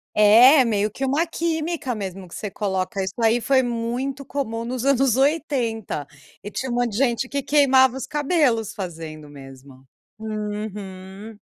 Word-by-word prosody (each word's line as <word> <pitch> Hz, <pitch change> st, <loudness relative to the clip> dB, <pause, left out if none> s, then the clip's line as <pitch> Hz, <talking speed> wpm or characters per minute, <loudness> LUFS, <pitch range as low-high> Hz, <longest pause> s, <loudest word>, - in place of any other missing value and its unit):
É. 240 Hz, +7 st, +7 dB
Meio 210 Hz, -2 st, 0 dB
que 270 Hz, -, -5 dB
uma 295 Hz, +6 st, +1 dB
química 320 Hz, -5 st, -2 dB
mesmo 190 Hz, -3 st, -6 dB
que -, -, -12 dB
você 210 Hz, -, -5 dB
coloca. 190 Hz, -1 st, -2 dB
Isso 190 Hz, 0 st, -4 dB
aí 230 Hz, +2 st, +3 dB
foi 265 Hz, +1 st, +3 dB
muito 245 Hz, +4 st, -3 dB
comum 230 Hz, -4 st, -4 dB
nos 250 Hz, +1 st, -4 dB
anos 270 Hz, -3 st, +3 dB
80. 255 Hz, -, -1 dB, 0.4 s
E 205 Hz, -, -6 dB
tinha 260 Hz, +4 st, -4 dB
um -, -, -2 dB
monte 245 Hz, -1 st, 0 dB
de 205 Hz, -, -3 dB
gente 260 Hz, -1 st, +1 dB
que 280 Hz, -1 st, -2 dB
queimava 265 Hz, -2 st, +4 dB
os 265 Hz, -, -5 dB
cabelos 285 Hz, -, 0 dB
fazendo, 160 Hz, -5 st, -7 dB
mesmo. 135 Hz, -1 st, -14 dB, 0.3 s
Uhum. 210 Hz, -1 st, -6 dB
230 Hz, 155 wpm, -22 LUFS, 200-270 Hz, 0.4 s, É